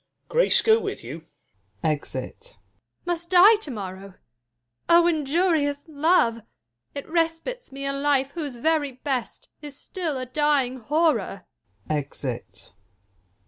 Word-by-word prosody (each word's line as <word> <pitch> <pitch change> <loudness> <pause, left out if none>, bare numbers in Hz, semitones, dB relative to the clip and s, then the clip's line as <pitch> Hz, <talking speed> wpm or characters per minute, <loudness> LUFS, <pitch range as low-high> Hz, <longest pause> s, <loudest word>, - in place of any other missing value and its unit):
Grace - - +3
go 445 0 +5
with - - -5
you! 155 +7 -8 0.6
[Ej 150 -4 -1
it. 130 -1 -6
Jul. - - -13 0.5
Must 345 -1 -2
die 375 +5 +8
to 410 -8 -8
morrow 195 -5 -6
1 190 - -19 0.7
oh 340 0 +7
injurious 305 -2 +1
love! 290 -7 +2 0.5
It 280 - -6
respites 335 - -1
me 275 +1 -6
a 275 - -1
life 275 -1 +1
whose 290 -5 -5
very 290 +2 0
best 255 -2 -4
Is 290 -2 -7
still 330 -7 -4
a 255 - -4
dying 270 -1 +1
horror. 255 - 0 0.4
[Exit. 140 -4 -4
285 Hz, 130 wpm, -25 LUFS, 240-330 Hz, 0.7 s, die